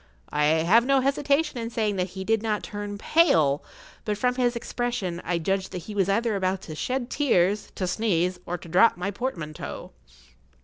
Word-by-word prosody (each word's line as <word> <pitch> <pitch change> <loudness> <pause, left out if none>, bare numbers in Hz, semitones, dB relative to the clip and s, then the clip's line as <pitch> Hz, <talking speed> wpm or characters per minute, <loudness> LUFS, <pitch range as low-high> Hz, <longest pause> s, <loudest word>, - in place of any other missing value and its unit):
I 150 0 +2
have 165 +9 +4
no 270 +1 +3
hesitation 280 +1 +1
in 230 0 -3
saying 215 -4 -1
that 180 0 0
he 190 - -3
did 220 +2 +1
not 215 -2 -1
turn 205 0 -5
pale; 160 - +3 0.4
but, 210 -1 -2
from 250 +4 +1
his 245 -1 +1
expression, 235 -7 -3
I 175 0 -1
judged 190 +3 -1
that 180 -2 -5
he 210 - -8
was 195 -2 +1
either 225 +2 +1
about 190 -1 -1
to 155 - -7
shed 250 +9 -3
tears, 210 -8 +1
to 185 - -2
sneeze, 180 -2 0
or 175 - -2
to 170 - -12
drop 180 +7 +4
my 180 +3 -2
portmanteau. 175 -10 -5
205 Hz, 185 wpm, -26 LUFS, 180-240 Hz, 0.4 s, have